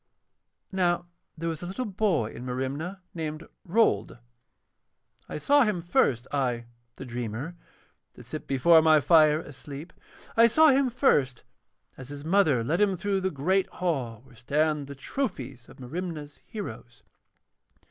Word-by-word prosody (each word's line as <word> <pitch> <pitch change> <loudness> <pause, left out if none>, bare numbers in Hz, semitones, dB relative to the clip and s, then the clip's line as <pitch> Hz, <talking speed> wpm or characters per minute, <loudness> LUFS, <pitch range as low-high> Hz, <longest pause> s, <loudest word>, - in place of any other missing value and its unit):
Now 175 -2 +1 0.3
there 165 +1 -3
was 165 -1 -3
a 175 - -5
little 225 +8 -3
boy 185 - 0
in - - -8
Merimna 135 +9 -4
named 155 -1 -5 0.2
Rold. 170 - +1 1.1
I - - -4
saw 285 - +4
him 210 -8 +1
first, 130 -8 +2
I, 125 -4 -1 0.3
the - - -8
dreamer, 120 +6 -5 0.6
that - - -13
sit - - -7
before 160 +5 +5
my 155 -1 +6
fire 155 -1 +5
asleep, 145 +2 -9 0.4
I 230 +1 +7
saw 310 +7 +6
him 270 -1 +3
first 145 - +2 0.5
as 130 0 -9
his 145 0 -8
mother 160 -9 +3
led 165 - 0
him 195 -3 +3
through 195 +2 0
the 190 0 0
great 185 +6 +1
hall 130 -11 -2
where 135 -2 -19
stand 145 +4 0
the 140 - -8
trophies 135 - -4
of - - -15
Merimna's 150 +2 -6
heroes. 120 - -8
155 Hz, 145 wpm, -27 LUFS, 130-185 Hz, 1.1 s, I